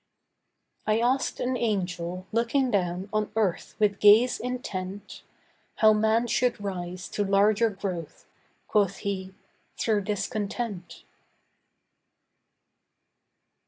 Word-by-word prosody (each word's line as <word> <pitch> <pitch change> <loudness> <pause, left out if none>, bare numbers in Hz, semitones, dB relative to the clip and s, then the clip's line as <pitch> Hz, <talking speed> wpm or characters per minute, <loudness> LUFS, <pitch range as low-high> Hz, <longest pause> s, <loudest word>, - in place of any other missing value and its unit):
I 215 +1 +3
asked 255 +3 0
an 255 +1 -1
Angel, 180 -5 -2
looking 240 +3 +1
down 180 -1 -1
on 215 0 0
earth 205 -6 -1
with 205 -2 +1
gaze 220 +4 +6
intent, 205 -6 -5 0.5
How 215 -1 +6
man 220 +2 +2
should 240 0 +1
rise 185 -2 -5
to 205 - -1
larger 205 +3 +3
growth. 185 -6 -6 0.4
Quoth 200 -2 +2
he, 190 -1 -3 0.4
'Through 215 -3 +1
discontent. 205 -3 -4
205 Hz, 95 wpm, -27 LUFS, 190-225 Hz, 0.5 s, gaze